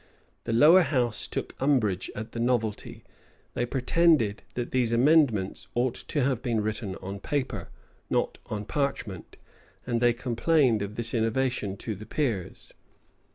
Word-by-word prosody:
The - - -2
lower 150 +11 +7
house 125 - 0
took - - -4
umbrage 115 -10 +1
at 110 +1 -6
the 115 - -6
novelty: 115 -3 -1 0.5
they 120 - -1
pretended 130 -4 +2
that 120 -1 -3
these 125 -3 +1
amendments 120 -6 +3
ought 120 0 +1
to 145 -4 -2
have 130 -2 0
been 120 -4 0
written 105 -2 -3
on 100 +1 -5
paper, 130 - -3 0.4
not - - 0
on 105 -1 -4
parchment; 115 - -3 0.5
and 120 -1 -1
they 120 -1 +4
complained 120 0 +2
of 100 +1 -5
this 115 0 -3
innovation 115 -3 0
to 110 - -4
the 105 +1 -10
peers. 115 - -3
120 Hz, 145 wpm, -27 LUFS, 110-130 Hz, 0.5 s, lower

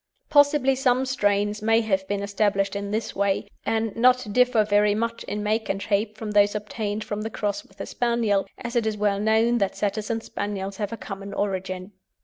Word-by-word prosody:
Possibly 285 -2 +5
some 260 -1 +2
strains 205 -4 0
may 225 +1 +3
have 190 -3 -1
been 200 0 -2
established 200 -1 0
in 200 0 -3
this 215 +2 -3
way, 200 0 0 0.2
and 225 -1 0
not 250 -2 +3
differ 250 -2 +4
very 205 0 +3
much 230 +1 -2
in 210 0 -3
make 215 +1 0
and 195 - -1
shape 210 +1 -1
from 215 -1 -5
those 205 0 +4
obtained 210 0 -3
from 210 0 -4
the 220 - -3
cross 205 -2 -3
with 195 - -24
the - - -5
Spaniel, 230 -5 0
as 235 0 -6
it 230 -2 +2
is 215 -1 -1
well 205 -1 +1
known 220 +3 +3
that 195 -2 0
Setters 210 +1 -2
and 225 -1 -2
Spaniels 195 -1 -4
have 205 -2 -3
a 230 - -5
common 195 -1 -7
origin. 190 -1 -3
210 Hz, 200 wpm, -25 LUFS, 200-230 Hz, 0.2 s, Possibly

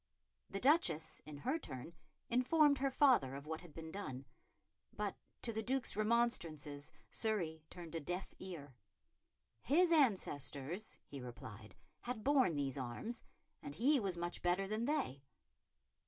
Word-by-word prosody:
The 195 - -3
Duchess, 190 - +3
in 150 -1 -7
her 265 - 0
turn, 130 - -7 0.3
informed 285 +4 +4
her 275 0 +2
father 255 - +4
of 140 +1 -7
what 160 +1 -4
had 175 -3 -12
been 160 -1 -6
done, 135 -10 -5 0.7
but 205 -2 -2 0.3
to 230 - +1
the 220 - -1
Duke's 255 +2 0
remonstrances 170 -11 +1 0.2
Surrey 175 -8 0
turned 170 -2 -9
a 165 - -1
deaf 180 +5 -4
ear. 160 -8 -7 0.9
His 335 +6 +4
ancestors, 185 - +1
he 140 - -8
replied, 110 -4 -9 0.2
had 240 -3 -4
borne 265 - +4
these 140 -2 -1
arms, 135 - -4 0.4
and 145 - -7
he 275 - +4
was 195 -5 -1
much 175 0 -2
better 180 +2 +2
than 215 +3 -1
they. 145 - 0
185 Hz, 140 wpm, -38 LUFS, 145-240 Hz, 0.9 s, informed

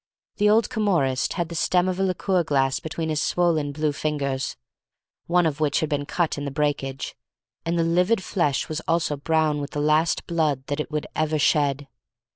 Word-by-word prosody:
The 210 0 +4
old 220 +1 +4
Camorrist 170 - +1
had 170 -3 -2
the - - -6
stem 180 +2 +2
of 185 0 -2
a - - +2
liqueur 185 -1 +1
glass 135 -4 +1
between 160 0 -4
his 155 0 0
swollen 165 -5 +1
blue 150 +1 0
fingers, 140 -3 -2 0.7
one 175 0 +3
of 155 -1 -1
which 150 -2 +2
had 155 - -1
been 145 -1 -2
cut 170 -4 -1
in 145 - -4
the - - -2
breakage, 140 -2 -2 0.5
and 170 +1 0
the 165 - +2
livid 180 +5 +2
flesh 150 -8 0
was 155 0 -4
also 165 -2 +1
brown 155 0 +1
with 140 - -4
the 145 - -2
last 155 +2 +2
blood 155 -6 0
that 145 +1 -3
it 150 - -3
would 150 -1 -2
ever 155 0 +1
shed. 145 -1 +2
155 Hz, 195 wpm, -24 LUFS, 145-170 Hz, 0.7 s, The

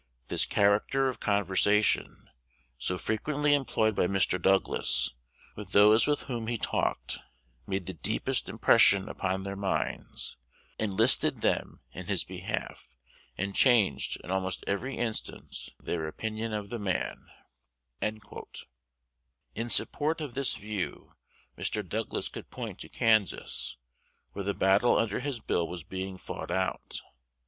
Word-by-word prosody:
This - - +3
character 105 +7 +3
of 130 - -6
conversation, 100 +1 +2 0.5
so 90 +8 -1
frequently 145 +9 0
employed 110 -6 +2
by 90 - +2
Mr. 95 -2 +2
Douglas 95 +2 +2 0.4
with 100 -2 -9
those 105 +4 +7
with 150 -1 +1
whom 120 -4 -4
he 120 0 -1
talked, - - -1 0.5
made 95 -2 -2
the 95 - -4
deepest 80 - 0
impression 100 0 +5
upon 95 0 -2
their 100 0 -4
minds, 100 -1 -3 0.4
enlisted 110 +4 +4
them - - 0
in - - -8
his - - +1
behalf, - - -5 0.4
and 100 +1 -2
changed, 120 -6 +3
in - - -6
almost 95 0 -1
every 125 +7 -2
instance, 115 -2 -3
their 80 -2 -3
opinion 110 +6 -4
of 105 -1 -4
the 120 - -3
man." 95 -4 -2 0.7
In 60 - -8
support 155 +6 +4
of 150 -6 -5
this 135 -1 0
view, 105 -2 -4 0.4
Mr. 105 -3 -1
Douglas 110 +4 -2
could - - -9
point - - -6
to - - -9
Kansas, 110 -10 +1 0.5
where 100 - -5
the 100 +1 -1
battle 100 +5 +4
under 110 -3 0
his 135 -2 -3
bill 85 -5 0
was 85 -2 -6
being 95 +1 -5
fought - - -7
out. 95 +1 -2
100 Hz, 130 wpm, -29 LUFS, 95-115 Hz, 0.7 s, those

